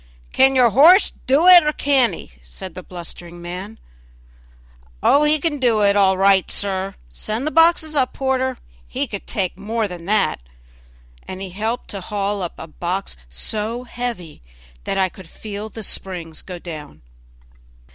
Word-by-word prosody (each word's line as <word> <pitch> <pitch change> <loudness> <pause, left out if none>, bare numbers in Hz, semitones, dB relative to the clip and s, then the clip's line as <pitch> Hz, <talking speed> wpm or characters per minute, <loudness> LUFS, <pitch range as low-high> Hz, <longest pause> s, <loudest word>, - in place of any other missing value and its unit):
"Can 265 0 +4
your 245 -3 +5
horse 330 - +6 0.2
do 280 +6 +4
it, 360 -2 +10
or 300 - +1
can't 275 -5 +2
he?" - - -12
said 60 - -9
the 185 - -8
blustering 175 -1 -9
man. 180 +5 -7 1.3
"Oh! 290 +1 +5
he 300 +1 +3
can 295 -2 -2
do 235 -4 +2
it 200 0 +4
all 190 -2 +4
right, 195 -1 +4
sir; 195 -1 -1
send 215 - -4
up - - -3
the 305 - -1
boxes, 325 -1 +4 0.2
porter; 260 -1 -1 0.3
he - - -2
could - - -8
take 180 - -3
more 220 +2 -2
than 175 -3 -9
that;" 205 - +1 0.9
and 185 - -7
he 190 -1 -6
helped 220 +6 -3
to 200 - -5
haul 200 +1 -2
up 175 - -5
a - - -7
box 175 - -4
so 215 - -2
heavy 235 -10 -6 0.4
that - - -2
I 190 -1 +3
could 185 -1 -14
feel 210 +2 -7
the 220 +1 -8
springs 175 -5 -3
go 180 -2 -8
down. 155 - -10
200 Hz, 165 wpm, -20 LUFS, 180-250 Hz, 1.3 s, it